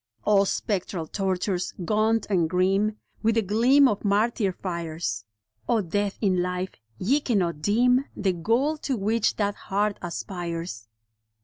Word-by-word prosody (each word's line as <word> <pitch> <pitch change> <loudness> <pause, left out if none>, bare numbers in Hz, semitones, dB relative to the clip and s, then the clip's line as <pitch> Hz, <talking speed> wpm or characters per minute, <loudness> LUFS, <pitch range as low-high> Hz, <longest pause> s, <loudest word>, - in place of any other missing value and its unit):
O 200 -1 +4
spectral 190 -4 -2
tortures, 185 0 -2
gaunt 220 +3 +2
and 175 -6 +1
grim 195 +4 +1 0.2
With 225 0 +2
the 225 - +2
gleam 245 +8 +5
of 210 -5 -1
martyr 210 0 +2
fires 165 - -4 0.2
— 110 0 -31
O 230 - +3
death 200 +2 -1
in 185 -4 +2
life, 180 +1 -2 0.3
ye 260 - +2
cannot 185 - 0
dim 245 - +3
The 195 -2 0
goal 235 - +1
to 270 -4 -2
which 215 +2 +1
that 205 -1 0
heart 205 +1 -1
aspires. 170 - -5
200 Hz, 140 wpm, -25 LUFS, 175-220 Hz, 0.3 s, gleam